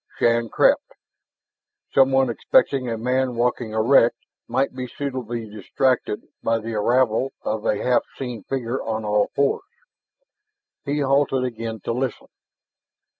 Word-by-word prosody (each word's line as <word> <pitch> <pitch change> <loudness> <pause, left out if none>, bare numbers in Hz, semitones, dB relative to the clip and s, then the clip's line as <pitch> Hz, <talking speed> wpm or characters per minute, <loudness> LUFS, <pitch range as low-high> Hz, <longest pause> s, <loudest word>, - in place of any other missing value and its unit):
Shann 115 -1 +2
crept. - - +2 1.0
Someone 135 -1 +4
expecting 130 +2 +2
a 115 - -2
man 125 +2 0
walking 120 -1 0
erect 115 +2 +4 0.3
might 135 +1 0
be 130 -1 -4
suitably 125 -5 -4
distracted 110 +3 -1 0.2
by 115 0 +1
the 115 +1 -5
arrival 120 +3 +1
of 110 0 -2
a - - +2
half 125 -1 +3 0.2
seen 125 -4 -5
figure 130 -1 -2
on 110 -1 -3
all 105 0 +2
fours. 140 0 +2 1.2
He 145 +1 -1
halted 135 -1 +2
again 115 -3 -4
to 115 - -2
listen. 130 +1 -3
125 Hz, 125 wpm, -23 LUFS, 115-130 Hz, 1.2 s, Someone